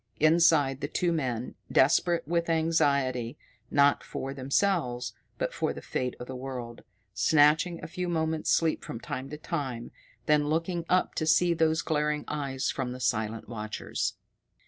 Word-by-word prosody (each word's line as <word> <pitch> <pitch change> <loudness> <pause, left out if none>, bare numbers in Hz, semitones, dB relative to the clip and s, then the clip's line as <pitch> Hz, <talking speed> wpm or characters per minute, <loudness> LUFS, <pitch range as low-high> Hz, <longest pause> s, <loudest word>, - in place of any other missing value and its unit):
Inside 155 -4 +4
the 145 - -1
two 175 +3 0
men, 125 -7 -2 0.2
desperate 165 +4 +3
with 170 0 0
anxiety, 140 -7 +1 0.3
not 140 0 +4
for 135 +1 -5
themselves, 140 -2 0 0.2
but - - -2
for - - -1
the - - -8
fate 125 -1 -2
of 125 - -6
the 130 - -7
world, 125 -2 -6 0.3
snatching 155 - +4
a - - -4
few 180 +2 -4
moments' 160 -1 -1
sleep 165 -1 +2
from 115 - -6
time 130 +2 -5
to 150 - -6
time, 135 -7 -4 0.3
then 150 -1 +3
looking 165 +2 -1
up 185 0 +2
to 155 - -2
see 175 +2 +4
those 160 -1 +2
glaring 150 -1 0
eyes 140 -3 -2
from 125 -2 -3
the 125 - -8
silent 110 -2 -1
watchers. 110 -2 -3
150 Hz, 155 wpm, -28 LUFS, 130-165 Hz, 0.3 s, Inside